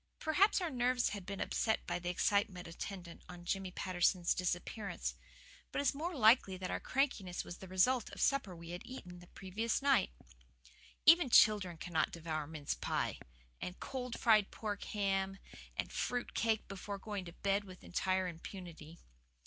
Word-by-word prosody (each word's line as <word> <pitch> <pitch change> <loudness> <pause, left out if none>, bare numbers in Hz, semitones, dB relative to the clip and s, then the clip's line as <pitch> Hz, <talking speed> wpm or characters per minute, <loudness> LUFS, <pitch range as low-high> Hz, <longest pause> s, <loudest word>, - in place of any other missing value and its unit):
Perhaps 375 +6 +3
our 345 -3 -1
nerves 250 -1 +2
had 200 -3 -6
been 200 0 -4
upset 220 -1 0
by - - -2
the 175 0 -3
excitement 185 0 +1
attendant 175 0 -7
on 175 -1 -10
Jimmy 195 +1 -1
Patterson's 180 -1 +1
disappearance. 185 +3 -2 0.6
But - - -4
it - - +1
is 285 - +3
more 330 +5 -3
likely 220 -5 +5
that 185 0 -4
our - - -1
crankiness 245 -10 -1
was 175 - -8
the 190 - -10
result 210 +7 +2
of - - -14
the - - -14
supper 270 -10 +1
we 170 0 -9
had 175 - -5
eaten 180 -8 -9
the 175 - -14
previous 205 +6 -2
night. 270 -8 +3 1.0
Even 330 -2 +8
children 205 -7 +5
cannot 165 -1 0
devour 155 -3 -3
mince 155 -2 -3
pie, - - -2 0.4
and 180 - -5
cold 250 -3 -4
fried 215 -4 +5
pork 205 -2 -4
ham, 195 -1 0 0.4
and - - -3
fruit 245 -1 -2
cake 220 -1 +1
before 200 +1 -5
going 205 -1 -5
to 170 - -9
bed 200 +2 0
with 185 -2 -12
entire 185 +1 0
impunity. 170 -2 -9
195 Hz, 170 wpm, -35 LUFS, 180-230 Hz, 1.0 s, Even